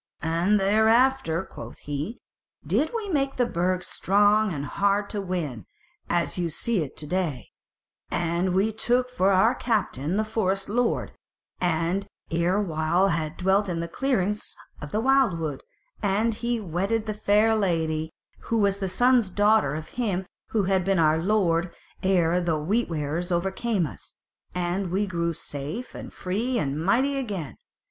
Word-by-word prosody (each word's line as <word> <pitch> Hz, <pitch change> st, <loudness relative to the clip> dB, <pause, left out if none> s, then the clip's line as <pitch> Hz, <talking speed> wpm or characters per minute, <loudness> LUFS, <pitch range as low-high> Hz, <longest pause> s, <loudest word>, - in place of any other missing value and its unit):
"And 170 Hz, +6 st, +2 dB
thereafter," 220 Hz, -2 st, +3 dB
quoth -, -, -10 dB
he, 145 Hz, -, -4 dB, 0.5 s
"did 310 Hz, -, +1 dB
we 450 Hz, -3 st, -3 dB
make 275 Hz, -5 st, 0 dB
the 245 Hz, -, +2 dB
Burg 185 Hz, -2 st, 0 dB
strong 205 Hz, +3 st, +3 dB
and 145 Hz, -4 st, -3 dB
hard 200 Hz, +7 st, 0 dB
to 205 Hz, -, -2 dB
win, 160 Hz, -, -4 dB, 0.4 s
as 175 Hz, +1 st, 0 dB
ye 170 Hz, -1 st, 0 dB
see 210 Hz, +5 st, -1 dB
it 145 Hz, -, -6 dB
to 150 Hz, -, -1 dB
day; 155 Hz, -, -2 dB, 0.6 s
and 175 Hz, +2 st, 0 dB
we 200 Hz, +4 st, +2 dB
took 250 Hz, +3 st, +1 dB
for 195 Hz, -6 st, +2 dB
our 195 Hz, +6 st, +4 dB
captain 190 Hz, -, -1 dB
the 215 Hz, -, +2 dB
Forest 195 Hz, -3 st, -1 dB
Lord, 240 Hz, +2 st, 0 dB, 0.5 s
who 175 Hz, +2 st, +1 dB, 0.3 s
ere 170 Hz, +4 st, +2 dB
while 170 Hz, 0 st, +1 dB
had 160 Hz, -2 st, -2 dB
dwelt 190 Hz, +2 st, +2 dB
in 170 Hz, -2 st, -2 dB
the 170 Hz, -, -3 dB
clearings 210 Hz, -1 st, -1 dB, 0.3 s
of 150 Hz, -, -7 dB
the 215 Hz, -, 0 dB
wildwood, 195 Hz, -, +2 dB, 0.4 s
and 210 Hz, +3 st, +1 dB
he 235 Hz, +2 st, -2 dB
wedded 200 Hz, +4 st, -1 dB
the 215 Hz, -, -2 dB
Fair 210 Hz, +2 st, +3 dB
Lady 160 Hz, -5 st, 0 dB, 0.3 s
who 230 Hz, -, 0 dB
was 200 Hz, -2 st, +2 dB
the 190 Hz, -1 st, -2 dB
son's 245 Hz, +2 st, +3 dB
daughter 205 Hz, -6 st, +3 dB
of 155 Hz, 0 st, -6 dB
him 200 Hz, -7 st, -2 dB, 0.2 s
who 215 Hz, -3 st, 0 dB
had 190 Hz, -1 st, +2 dB
been 195 Hz, +1 st, +1 dB
our 160 Hz, -1 st, +3 dB
lord 175 Hz, -3 st, +1 dB, 0.3 s
ere 180 Hz, -2 st, +2 dB
the 165 Hz, -3 st, 0 dB
Wheat 200 Hz, +10 st, 0 dB
wearers 160 Hz, +3 st, -2 dB
overcame 190 Hz, +3 st, 0 dB
us; 145 Hz, -, -10 dB, 0.4 s
and 180 Hz, +1 st, -1 dB
we 195 Hz, +4 st, +1 dB
grew 170 Hz, -3 st, -1 dB
safe 155 Hz, -, -6 dB
and -, -, -8 dB
free 225 Hz, +8 st, -2 dB
and 145 Hz, -4 st, -1 dB
mighty 265 Hz, +9 st, +2 dB
again. 200 Hz, -, -4 dB
190 Hz, 155 wpm, -26 LUFS, 170-215 Hz, 0.6 s, our